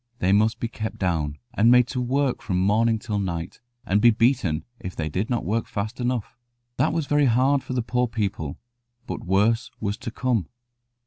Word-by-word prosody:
They 95 -5 +1
must 110 +3 +3
be 115 - -1
kept 110 -1 -5
down, 80 -6 -1 0.2
and 115 0 +4
made 125 0 +6
to 125 - -2
work 130 +1 0
from 90 -3 -1
morning 110 +4 +3
till 105 -1 -3
night, 85 -2 -4 0.2
and 100 +2 +2
be 120 - +7
beaten 115 - +1
if 90 - -7
they 80 -1 -2
did 95 +8 -2
not 120 -7 -1
work 110 +5 -1
fast 110 +4 -4
enough. 120 -2 -2 0.4
That 135 +5 +2
was 160 -2 -1
very 145 0 +3
hard 130 +3 +3
for 130 0 -6
the 125 -2 0
poor 125 +1 0
people; 100 -10 -3 0.5
but - - -5
worse 105 +6 +2
was 100 0 -2
to - - -6
come. 115 -6 -1
110 Hz, 195 wpm, -24 LUFS, 95-125 Hz, 0.5 s, be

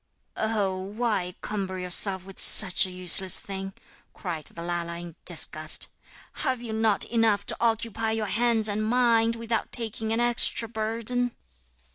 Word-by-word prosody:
'Oh, 210 -4 -1
why 195 -2 -3
cumber 190 -3 -5
yourself 185 +1 +2
with 195 -1 -13
such 190 0 +6
a - - -9
useless 185 0 +5
thing,' 195 0 -7 0.4
cried 165 -5 -6
the 170 - -4
Lala 170 -1 -4
in 170 -2 -10
disgust; - - 0 0.5
'have 260 -3 -2
you 235 -2 -7
not 220 -2 +1
enough 225 -3 0
to - - +1
occupy 225 -1 -1
your 220 -1 -2
hands 225 +1 +1
and 210 +1 -2
mind, 230 0 +2
without 230 0 -4
taking 220 -1 -4
an 225 - -1
extra 240 -1 +2
burden?' 230 +2 -3
215 Hz, 145 wpm, -25 LUFS, 190-230 Hz, 0.5 s, such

